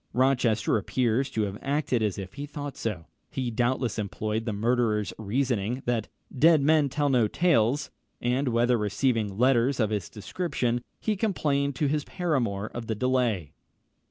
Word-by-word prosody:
Rochester 125 -4 +2
appears 125 +4 0
to 110 -4 -1
have 100 0 -4
acted 140 -4 0
as 105 -3 0
if 95 -2 -7
he 145 +1 -6
thought 145 -2 -6
so. 95 -8 -4 0.2
He 125 -2 -3
doubtless 120 0 0
employed 110 +2 -2
the 115 - -1
murderer's 110 -2 +1
reasoning, 120 +1 -1
that 115 -3 0 0.3
"dead 155 +2 +5
men 150 -1 +4
tell 145 +2 0
no 125 -5 +3
tales," 145 - +2 0.3
when, 125 +3 0
after 120 0 +3
receiving 105 -1 0
letters 125 +1 +3
of 110 -2 +1
this 105 -4 -2
description, 120 - -2 0.2
he 215 - 0
complained 145 - 0
to 150 - 0
his 150 +1 0
paramour 120 - -1
of 120 -1 -6
the 110 - -1
delay. 120 - 0
120 Hz, 155 wpm, -27 LUFS, 110-140 Hz, 0.3 s, dead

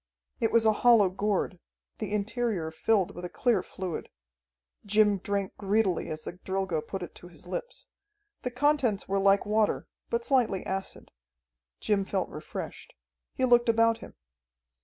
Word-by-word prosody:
It 225 - +1
was 230 -1 +4
a 220 - +5
hollow 230 -5 +6
gourd, 195 -2 -1 0.4
the 215 -3 -4
interior 210 -5 -1
filled 195 +3 +1
with 175 - -8
a 180 - -4
clear 230 -3 +2
fluid. 185 -1 -6 0.7
Jim 210 -1 +3
drank 200 0 -2
greedily 200 -2 +1
as 155 0 -5
the - - -5
Drilgo 190 -2 -2
put 185 +4 -5
it - - -8
to 175 - -12
his 175 -1 -16
lips. 190 - -6 0.6
The 250 - -2
contents 250 -5 +1
were 195 0 +1
like 195 0 +4
water, 215 +1 +1 0.2
but 470 0 -1
slightly 235 -8 +2
acid. 190 0 -4 0.7
Jim 205 -2 +1
felt 190 -1 -2
refreshed. 150 - -7 0.4
He 260 - +2
looked 240 -1 +4
about 230 0 +4
him. - - -11
200 Hz, 155 wpm, -28 LUFS, 190-230 Hz, 0.7 s, hollow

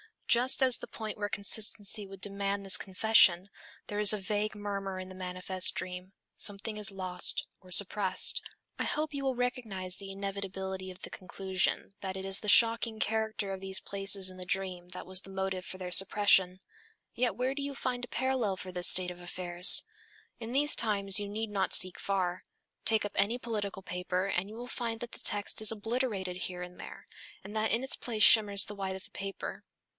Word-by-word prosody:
Just 255 +3 +3
at 260 -1 +2
the - - -5
point 220 -1 -7
where 205 -1 -3
consistency 205 0 +3
would 195 -1 -13
demand 200 0 -2
this 195 - +8
confession, 190 -2 +3 0.4
there 205 - -5
is 210 0 +9
a - - -1
vague 210 +2 -3
murmur 200 -2 -5
in 185 0 -8
the - - -11
manifest 185 0 -1
dream, 180 +1 -7 0.2
something 205 +1 +1
is 210 0 0
lost 185 -2 +3
or 185 - -19
suppressed. 190 +1 +2 0.4
I - - -1
hope 305 0 -3
you 275 -1 -4
will 265 -1 -1
recognize 220 -7 -2
the 195 -1 -8
inevitability 195 -1 -6
of 185 +1 -12
the - - -7
conclusion 190 +1 -3
that 190 -1 -6
it 190 - -7
is 195 0 -1
the 210 - -8
shocking 230 0 +4
character 220 -2 -2
of 190 - -7
these 190 0 -4
places 195 -1 +3
in 185 - -12
the 180 - -6
dream 180 -2 -4
that 180 - -9
was 185 0 +2
the 195 - -14
motive 190 -1 -4
for 185 - -8
their 180 -1 -7
suppression. 190 -1 +3 0.5
Yet 245 -1 -1
where 255 +2 -2
do 280 - -6
you 280 0 -5
find 250 -2 -4
a - - -22
parallel 250 -6 -2
for 185 0 -9
this 180 -1 +3
state 180 -1 +5
of 175 - -12
affairs? 175 0 +5 0.6
In 235 +1 -7
these 295 +2 +4
times 200 -3 +3
you 205 - -5
need 215 +2 -5
not 195 -2 -2
seek 185 0 +5
far. 185 -2 -2 0.4
Take 220 -1 +2
up 205 - -5
any 205 +5 0
political 210 -5 -5
paper 180 +1 -3
and 195 0 -3
you 215 - -11
will 240 +2 -8
find 230 -3 -5
that 240 - -7
the - - -10
text 205 0 0
is 220 - +6
obliterated 215 -4 -4
here 180 -1 -6
and 180 0 -12
there, - - -11 0.4
and 200 +2 -11
that 220 0 0
in 235 +3 0
its 265 - -1
place 220 -3 -2
shimmers 205 -3 +6
the 210 - -8
white 195 -2 -5
of 190 - -10
the - - -14
paper. 195 0 -7
200 Hz, 200 wpm, -29 LUFS, 185-220 Hz, 0.6 s, is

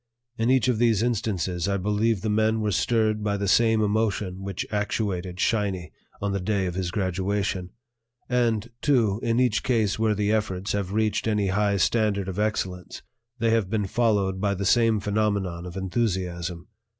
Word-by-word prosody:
In 115 0 0
each 130 -3 +3
of 120 -4 +1
these 115 -3 +3
instances 100 -7 -1
I 100 0 +1
believe 105 +2 0
the 110 - -3
men 110 +1 +2
were 105 -1 0
stirred 110 +1 +1
by 100 -1 0
the 100 0 -2
same 115 +1 +4
emotions 105 -3 0
which 95 -1 -4
actuated 100 -4 -2
"Shiny" 95 -8 0 0.3
on 100 0 -2
the 100 - -1
day 95 +1 0
of 90 - -2
his 90 -1 -2
graduation; 95 0 -1 0.6
and, 120 -2 0
too, 115 -8 +2
in 115 +1 +1
each 125 -4 +2
case 110 -5 +1
where 110 -1 +2
the 105 +1 0
efforts 100 -3 -1
have 100 -2 -2
reached 110 +1 0
any 105 -3 +1
high 100 +1 +1
standard 100 0 +1
of 95 +1 -4
excellence 95 -4 -3 0.3
they 115 0 +1
have 110 -4 +1
been 105 -1 0
followed 100 -3 +1
by 100 -1 +1
the 100 +1 -3
same 115 +1 +3
phenomenon 100 -4 -1
of 90 +2 -8
enthusiasm. 90 -4 -2
105 Hz, 175 wpm, -25 LUFS, 95-110 Hz, 0.6 s, same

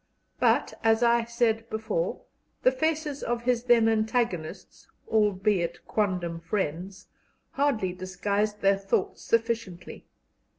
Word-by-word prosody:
But, - - +2
as 225 +1 +3
I 235 0 +3
said 230 -1 0
before, 220 - -2 0.4
the 255 - +6
faces 300 +1 -1
of 240 0 -2
his 245 -1 0
then 235 -2 +5
antagonists 220 -7 -2 0.2
albeit 195 -5 +1
quondam 180 -5 -1
friends 185 +1 -3 0.5
hardly 230 -10 0
disguised 200 +3 -2
their 195 0 +3
thoughts 195 0 -1
sufficiently. 225 -6 -2
220 Hz, 110 wpm, -27 LUFS, 185-235 Hz, 0.5 s, the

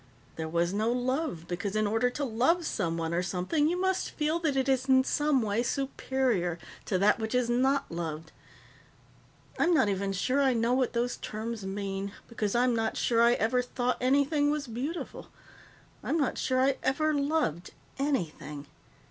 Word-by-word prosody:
There 160 -1 -4
was 170 +2 0
no 215 +3 +1
love 250 - -2
because 190 +4 -3
in 215 0 +2
order 225 +4 +2
to 285 +4 -4
love 265 +9 +1
someone 165 - -2
or 175 - +1
something 190 - 0
you 355 +1 -1
must 380 0 0
feel 310 +2 -1
that 310 -5 0
it 265 0 +1
is 265 0 +1
in 260 0 +6
some 295 -2 +1
way 210 +1 0
superior 250 - -1 0.3
to 190 - 0
that 205 +4 +3
which 220 +2 -2
is 245 -1 +1
not 265 +3 +1
loved. 160 -1 -5 1.3
I'm 345 0 +4
not 215 - +3
even 195 0 -1
sure 255 +9 +1
I 265 -2 +3
know 230 +1 +2
what 255 -1 +1
those 245 +1 -1
terms 220 -1 -5
mean, 195 0 -4
because 215 -2 -2
I'm 245 0 +3
not 225 -1 -1
sure 230 -1 +2
I 235 +1 +6
ever 245 +2 +1
thought 245 0 -1
anything 285 +3 +3
was 300 -1 -1
beautiful, 265 +8 -5 0.8
I'm 325 - 0
not 285 -5 0
sure 255 -1 +1
I 265 +1 +3
ever 310 +4 +1
loved 285 - 0 0.3
anything. 160 - -2
245 Hz, 175 wpm, -29 LUFS, 200-275 Hz, 1.3 s, in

